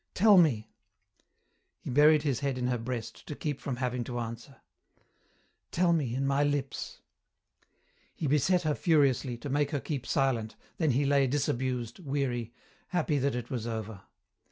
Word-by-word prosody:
"Tell 210 +1 +6
me." 120 -11 +2 1.1
He - - -6
buried 150 +3 +5
his 140 -6 0
head 140 -2 -1
in 125 - -2
her 125 -1 0
breast 115 -1 -6
to 150 - -5
keep 145 -2 -4
from 135 - -3
having 125 -1 -2
to 120 0 -5
answer. 115 +3 -6 1.1
"Tell 175 0 +2
me 135 -8 0
in 135 +1 -1
my 140 +1 +2
lips." 145 -2 -2 1.1
He - - -4
beset 150 +6 +2
her 155 -1 +1
furiously, 140 -7 +2
to 120 - -7
make 145 +1 +1
her 145 -2 -1
keep 135 -2 -4
silent, 125 -6 0 0.2
then 160 -3 +2
he 140 +3 +2
lay 140 -1 +3
disabused, 130 - -1
weary, 135 -7 -2 0.4
happy 160 -5 0
that 135 -1 0
it 120 +2 -5
was 120 -3 -3
over. 110 -3 -5
135 Hz, 160 wpm, -29 LUFS, 120-145 Hz, 1.1 s, Tell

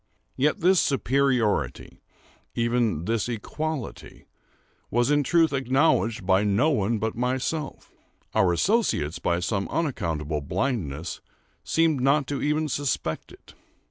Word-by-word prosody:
Yet 145 +3 +1
this 185 +1 +5
superiority—even 120 - -1
this 115 +2 -1
equality—was 125 -1 -5
in 145 0 +4
truth 160 +1 +2
acknowledged 130 - +1
by 95 +1 +3
no 105 +10 +2
one 110 -3 +1
but 110 +1 -2
myself; 130 +5 -3 0.4
our 90 -2 +3
associates, 85 - +1
by 85 0 0
some 95 +2 -1
unaccountable 80 - -2
blindness, 85 - -3 0.4
seemed 160 -5 +1
not 140 +2 +2
even 150 +2 0
to - - -4
suspect 125 - -2
it. - - -17
125 Hz, 110 wpm, -25 LUFS, 100-145 Hz, 0.4 s, this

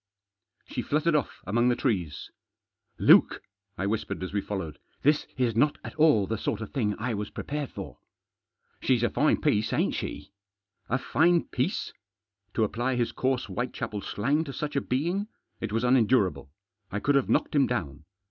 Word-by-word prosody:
She - - -4
fluttered 155 +3 +1
off 150 -4 -1
among 120 +4 +2
the 120 - +3
trees. 95 - -2 0.3
" - - -45
Luke," - - +6 0.3
I 95 - -1
whispered 105 -2 -2
as 95 - -5
we 100 - +1
followed, 95 -8 -5
" - - -39
this 150 +2 +3
is 120 -4 +1
not 145 +6 +3
at - - -7
all 150 -10 +4
the 110 +2 -3
sort 105 - -2
of 110 - -7
thing 105 -7 0
I 120 +2 -2
was 105 0 -3
prepared 145 -1 -4
for." - - -8 0.4
" - - -44
She's 125 -3 +2
a 120 - +2
fine 150 +5 +2
piece, 110 -9 +1
ain't - - +1
she? 75 - -5 0.3
" 100 0 -45
A - - -3
M - - +4
fine 170 +5 +3
piece! - - -2 0.3
" 100 -1 -50
To 110 - +3
apply 120 +4 0
his 120 -1 0
coarse 130 -1 0
Whitechapel 120 -4 -4
slang 140 +12 0
to 140 - -6
such 150 +1 -4
a 140 - +2
being! 170 +12 -1 0.3
It 115 - -4
was 115 +2 0
unendurable. 110 - +3 0.4
I 105 - -1
could 145 +7 +2
have 140 -2 +2
knocked - - +1
him 140 -2 +4
down. 80 - -3
120 Hz, 195 wpm, -27 LUFS, 105-140 Hz, 0.4 s, Luke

